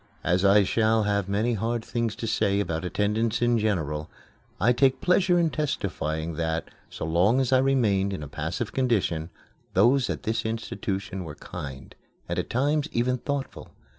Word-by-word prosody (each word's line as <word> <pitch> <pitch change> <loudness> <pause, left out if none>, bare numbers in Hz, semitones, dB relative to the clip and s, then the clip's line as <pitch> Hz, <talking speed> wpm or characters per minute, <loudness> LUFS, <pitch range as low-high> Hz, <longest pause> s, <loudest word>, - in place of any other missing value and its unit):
As 90 +2 +2
I 100 +1 +6
shall 110 +2 +2
have 100 -2 0
many 110 +4 +1
hard 115 +2 -2
things 115 -2 -2
to - - -5
say 100 -2 +1
about 80 -5 -2
attendants 105 +5 0
in 120 -1 +2
general, 80 -8 -1 0.5
I 115 +6 +4
take 130 +1 +3
pleasure 180 0 +3
in 165 -2 +2
testifying 85 - -2
that, 80 0 -2 0.2
so - - -5
long 90 +10 +3
as 130 -1 +1
I 130 - +6
remained 110 -8 +2
in 95 -6 -4
a - - -6
passive 70 - -4
condition, 100 -11 0 0.5
those 125 +8 +4
at - - -3
this 110 +1 -1
institution 100 -3 -3
were 80 -3 -8
kind, 70 -3 -8 0.3
and - - -2
at - - -3
times 145 +4 +1
even 125 +2 0
thoughtful. 140 +1 -5
110 Hz, 165 wpm, -26 LUFS, 90-120 Hz, 0.5 s, I